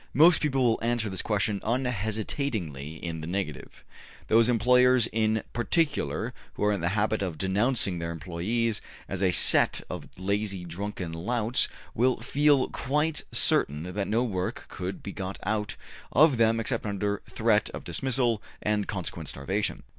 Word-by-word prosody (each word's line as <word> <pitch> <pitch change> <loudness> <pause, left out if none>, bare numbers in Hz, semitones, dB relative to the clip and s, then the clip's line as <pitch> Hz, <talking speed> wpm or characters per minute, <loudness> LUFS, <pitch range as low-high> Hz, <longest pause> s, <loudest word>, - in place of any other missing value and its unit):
Most 160 +4 +6
people 135 -4 +1
will 115 -2 +3
answer 115 -2 0
this 95 -1 -1
question 105 -1 0
unhesitatingly 110 - -2
in 80 -2 -4
the 80 - -6
negative. 90 -4 -4 0.5
Those 115 +2 +5
employers 125 +1 +5
in 110 -1 0
particular 135 -2 0 0.2
who - - -3
are 105 0 +3
in 100 - -2
the 85 - +1
habit 110 +1 +1
of 90 -5 -3
denouncing 100 -1 +1
their 85 0 -3
employes 95 +7 -1 0.3
as 95 -1 -4
a 95 - +4
set 90 - +5
of - - -6
lazy, 100 -1 -2
drunken 90 0 -5
louts, 115 +7 0 0.3
will 125 +1 +2
feel 140 +2 +3
quite 150 +4 0
certain 75 +2 +2
that 100 0 -2
no 115 +3 +2
work 95 -6 -3
could 90 +1 -5
be 100 - -5
got 95 0 -5
out 105 +1 -1 0.4
of 145 0 +5
them 115 0 +3
except 115 -1 -2
under 100 0 -1
threat - - +2
of - - -7
dismissal 125 -4 0 0.2
and 105 -1 0
consequent 85 -5 -4
starvation. 95 +10 -2
105 Hz, 155 wpm, -27 LUFS, 95-120 Hz, 0.5 s, Most